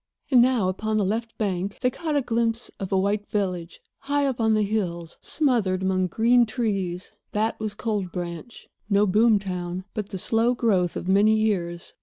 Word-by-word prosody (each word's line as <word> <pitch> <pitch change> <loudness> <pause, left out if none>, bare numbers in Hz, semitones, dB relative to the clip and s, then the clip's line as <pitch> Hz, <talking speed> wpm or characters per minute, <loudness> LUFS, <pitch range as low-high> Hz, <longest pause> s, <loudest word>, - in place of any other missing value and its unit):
And 250 -2 +7
now, 245 -6 +3
upon 215 +4 -1
the 205 - +2
left 225 +3 -3
bank, 195 -2 -2
they 250 - +2
caught 315 0 -3
a 285 - +2
glimpse 230 0 -1
of 195 - -5
a 190 - +3
white 200 +2 0
village, 180 -5 -3 0.2
high 285 0 0
up 260 -4 -1
on 220 -1 +3
the 215 - +2
hills, 175 -6 -3
smothered 225 -11 +1
among 185 -1 +1
green 235 +5 +3
trees. 195 -6 -2 0.2
That 220 +2 0
was 215 -1 -3
Cold 205 -5 -2
Branch—no 195 +3 -3
boom 215 +3 +4
town, 180 -2 -4
but 210 -3 -4
the 195 - -4
slow 225 +6 +2
growth 190 -8 +1
of - - -5
many 205 +3 +4
years. 180 -6 -1
210 Hz, 180 wpm, -25 LUFS, 185-230 Hz, 0.2 s, And